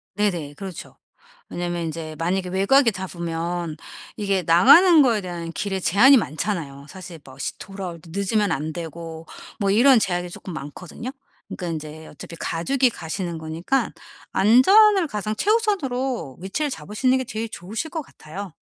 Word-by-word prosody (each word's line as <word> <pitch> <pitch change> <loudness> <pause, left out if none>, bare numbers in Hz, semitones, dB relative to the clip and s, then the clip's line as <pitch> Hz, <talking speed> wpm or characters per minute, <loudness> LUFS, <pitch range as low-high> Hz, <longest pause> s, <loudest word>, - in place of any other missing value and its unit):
네네 175 -8 -1
그렇죠. 190 0 -9 0.5
왜냐하면 175 -1 -3
인제 160 -1 -5
만약에 180 +2 -1
외곽에 230 +7 +4
잡으면 170 -3 -4 0.4
이게 200 -3 0
나가는 285 - +7
거에 230 -6 +3
대한 175 -2 -6
길에 195 0 -2
제한이 240 +10 +6
많잖아요. 155 - -3
사실 180 -1 -10
뭐 130 0 -14
시 140 - -4
돌아올 190 -4 -7
때 165 - -15
늦으면 200 +1 +1
안 155 +1 -2
되고 165 -1 -7 0.3
뭐 200 -1 +1
이런 245 +3 +6
제약이 175 -3 -1
쪼끔 175 +1 -9
많거든요. 175 - -7 0.4
그러니까 180 - -6
인제 155 -1 -6
어차피 170 +3 -10
가족이 255 +10 +1
가시는 170 -3 -5
거니까 160 +11 -1 0.4
안전을 380 - +6
가장 215 -3 -3
최우선으로 270 - 0
위치를 240 +11 -2
잡으시는 215 - 0
게 260 - -2
제일 225 -1 -4
좋으실 220 - -5
것 320 0 -4
같아요. 190 - -9
190 Hz, 350 characters per minute, -23 LUFS, 165-230 Hz, 0.5 s, 나가는